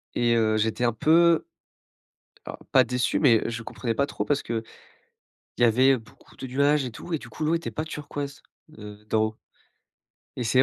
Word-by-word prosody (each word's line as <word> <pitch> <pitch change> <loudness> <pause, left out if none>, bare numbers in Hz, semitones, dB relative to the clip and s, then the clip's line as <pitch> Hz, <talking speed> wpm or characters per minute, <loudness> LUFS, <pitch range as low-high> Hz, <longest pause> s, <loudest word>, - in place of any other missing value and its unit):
Et 120 -1 +2
heu, 110 -1 +2
j'étais 110 +3 0
un 120 - +2
peu 165 +7 +4 1.0
alors - - -7
pas 130 -2 +6
déçu, 125 +1 0
mais 120 -7 +5
je 115 -1 -5
comprenais 115 0 -4
pas 140 - +1
trop - - -4
parce 145 -1 0
qu'il 115 -1 -3 1.0
y 120 - +4
avait 130 +4 +4
beaucoup 110 -2 -16
de - - -7
nuages 140 +3 +2
et 125 - -4
tout 175 - -9
et 160 - +1
du 140 - -12
coup 135 +7 -5
l'eau 155 +2 +2
était 170 - -3
pas 155 - -3
turquoise, 145 -2 -6 0.4
heu, 105 0 -11
d'en 110 0 +2
haut. 110 0 -7 1.0
Et 125 - -3
c'est 130 +3 +3
125 Hz, 190 wpm, -25 LUFS, 115-145 Hz, 1.0 s, pas